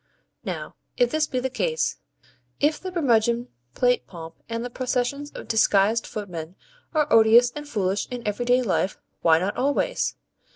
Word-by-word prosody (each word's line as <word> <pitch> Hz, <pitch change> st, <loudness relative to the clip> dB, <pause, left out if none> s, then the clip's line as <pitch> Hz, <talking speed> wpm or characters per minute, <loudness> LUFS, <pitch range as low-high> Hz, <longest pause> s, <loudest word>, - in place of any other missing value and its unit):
Now, -, -, -5 dB, 0.2 s
if -, -, +3 dB
this 310 Hz, -1 st, +1 dB
be 255 Hz, -, -2 dB
the 260 Hz, +1 st, -2 dB
case; 475 Hz, -, -1 dB, 0.6 s
if 300 Hz, +1 st, +2 dB
the 370 Hz, -, -6 dB
Brummagem 235 Hz, -7 st, +1 dB, 0.3 s
plate 245 Hz, 0 st, +2 dB
pomp 165 Hz, -2 st, -9 dB, 0.2 s
and 230 Hz, +1 st, -3 dB
the 245 Hz, -, -6 dB
processions 255 Hz, +3 st, -2 dB
of -, -, -8 dB
disguised 220 Hz, 0 st, +3 dB
footmen 180 Hz, -5 st, -6 dB, 0.4 s
are 305 Hz, -1 st, +4 dB
odious 230 Hz, +2 st, +6 dB
and 295 Hz, +2 st, -8 dB
foolish 200 Hz, -4 st, -1 dB
in 245 Hz, -3 st, -6 dB
everyday 245 Hz, +4 st, +2 dB
life, 195 Hz, -2 st, 0 dB, 0.2 s
why 160 Hz, -1 st, +5 dB
not 185 Hz, +4 st, -1 dB
always? 280 Hz, +3 st, 0 dB
240 Hz, 155 wpm, -24 LUFS, 210-275 Hz, 0.6 s, odious